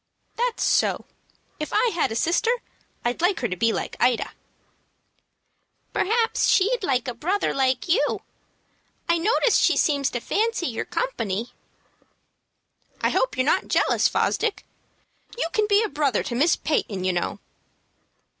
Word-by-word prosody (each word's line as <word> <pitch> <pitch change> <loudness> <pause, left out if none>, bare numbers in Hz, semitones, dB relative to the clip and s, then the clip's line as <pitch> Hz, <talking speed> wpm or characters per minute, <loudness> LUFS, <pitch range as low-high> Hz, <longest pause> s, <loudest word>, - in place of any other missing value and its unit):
"That's 485 +1 -1
so. - - +1 0.5
If 305 - -3
I - - +3
had 330 - 0
a - - -3
sister 340 - +1 0.6
I'd 240 +5 -1
like 360 +2 +2
her 240 - +1
to 185 - -3
be 230 +5 +2
like - - -4
Ida." 245 -2 +1 1.6
"Perhaps 455 +3 +1
she'd 455 +6 +3
like 260 -6 0
a 250 - -2
brother 365 - -1
like 265 +2 0
you. 355 +8 +1 0.8
I 335 0 +2
notice 450 +6 +3
she - - +3
seems 280 -3 +2
to 240 - -3
fancy 445 - -1
your 240 -7 -3
company." 230 - -3 1.5
"I - - +1
hope - - 0
you're 255 - +2
not 360 +6 +1
jealous, - - +2
Fosdick. 440 -2 -1 0.7
You - - 0
can 430 -1 +2
be 415 +1 +4
a - - 0
brother 285 - 0
to - - -5
Miss 295 +8 +3
Peyton, 200 -11 -2
you 185 0 +1
know." 175 - -2
320 Hz, 145 wpm, -24 LUFS, -, 1.6 s, be